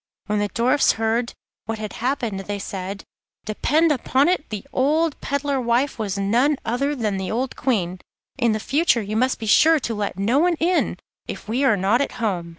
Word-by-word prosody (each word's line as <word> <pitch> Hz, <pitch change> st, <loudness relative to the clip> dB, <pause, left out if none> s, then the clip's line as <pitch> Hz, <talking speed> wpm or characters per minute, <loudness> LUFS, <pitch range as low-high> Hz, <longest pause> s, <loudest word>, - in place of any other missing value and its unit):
When 210 Hz, +1 st, 0 dB
the 205 Hz, -, +1 dB
Dwarfs 250 Hz, +7 st, +2 dB
heard 225 Hz, +2 st, -1 dB, 0.3 s
what 225 Hz, 0 st, -3 dB
had 215 Hz, -1 st, -6 dB
happened, 240 Hz, -6 st, -1 dB
they 205 Hz, +1 st, -4 dB
said: 195 Hz, 0 st, -6 dB, 0.4 s
'Depend 305 Hz, +10 st, +2 dB
upon 275 Hz, +1 st, +2 dB
it, 360 Hz, -4 st, -1 dB
the 215 Hz, +2 st, -6 dB
old 305 Hz, +4 st, +1 dB
peddler 280 Hz, -1 st, -1 dB
wife 240 Hz, +2 st, 0 dB
was 200 Hz, -3 st, -2 dB
none 240 Hz, +9 st, +2 dB
other 275 Hz, +6 st, 0 dB
than 215 Hz, -6 st, -1 dB
the 190 Hz, -1 st, -3 dB
old 255 Hz, +4 st, -2 dB
Queen. 185 Hz, -8 st, -1 dB, 0.4 s
In 230 Hz, -3 st, +2 dB
future 270 Hz, 0 st, +1 dB
you 210 Hz, +2 st, -4 dB
must 255 Hz, +3 st, +1 dB
be 220 Hz, -, -6 dB
sure 315 Hz, +9 st, +5 dB
to 235 Hz, -, -2 dB
let 205 Hz, -3 st, -3 dB
no 225 Hz, +8 st, +2 dB
one 350 Hz, +2 st, +3 dB
in, 340 Hz, +3 st, +1 dB, 0.3 s
if -, -, -7 dB
we 240 Hz, +6 st, 0 dB
are 255 Hz, -7 st, +4 dB
not 200 Hz, +7 st, +2 dB
at 280 Hz, -, -2 dB
home. 200 Hz, -8 st, -2 dB
235 Hz, 190 wpm, -22 LUFS, 210-280 Hz, 0.4 s, sure